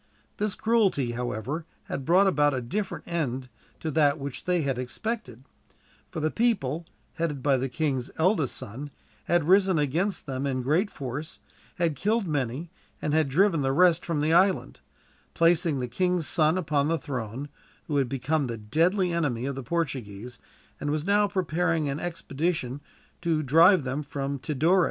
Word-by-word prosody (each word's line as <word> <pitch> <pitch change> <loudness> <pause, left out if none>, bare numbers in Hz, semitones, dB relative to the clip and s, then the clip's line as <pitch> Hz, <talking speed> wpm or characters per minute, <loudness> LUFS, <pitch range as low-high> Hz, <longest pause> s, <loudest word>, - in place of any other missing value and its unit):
This 210 -1 -1
cruelty, 200 - +2
however, 120 +6 -3 0.2
had 135 - -5
brought 180 +6 +5
about 145 -7 +3
a - - -1
different 195 - -4
end 135 -7 -2 0.3
to 160 - -2
that 145 -1 +3
which 140 -3 -6
they 180 -3 +1
had 135 -3 -1
expected; 130 - -4 0.7
for - - -5
the 155 0 0
people, 170 - 0 0.3
headed 150 -5 -2
by 140 -2 +4
the 130 +1 -2
king's 135 -3 -1
eldest 160 - +2
son, 135 +8 -6 0.4
had 170 -3 +2
risen 190 -1 +5
against 160 +8 0
them 135 -1 -3
in 130 -2 -1
great 165 - +2
force, 140 +2 -6 0.4
had 170 -4 0
killed 210 - +1
many, 145 +2 -2 0.3
and 150 - -2
had 155 -3 +3
driven 165 +2 +3
the 135 0 +1
rest 175 +2 +4
from 160 -4 -1
the 155 +2 +2
island; 190 +2 +3 0.6
placing 165 -3 +3
the 125 - -2
king's 180 +6 0
son 155 +2 +3
upon 150 -5 +1
the 165 +1 +1
throne, 130 -1 -5 0.4
who 145 - -1
had 135 -3 +1
become 135 +2 0
the 115 -1 -4
deadly 170 - +1
enemy 135 -8 0
of 140 - -2
the 135 - -5
Portuguese, 125 -7 -4 0.4
and 145 - -2
was 150 +1 -1
now 205 +1 +3
preparing 170 -4 0
an 140 +1 -2
expedition 160 -5 -2 0.4
to 165 -3 +1
drive 165 +5 +6
them 130 +3 -2
from 140 -1 -4
Tidore. 155 +6 +2
150 Hz, 165 wpm, -27 LUFS, 135-175 Hz, 0.7 s, drive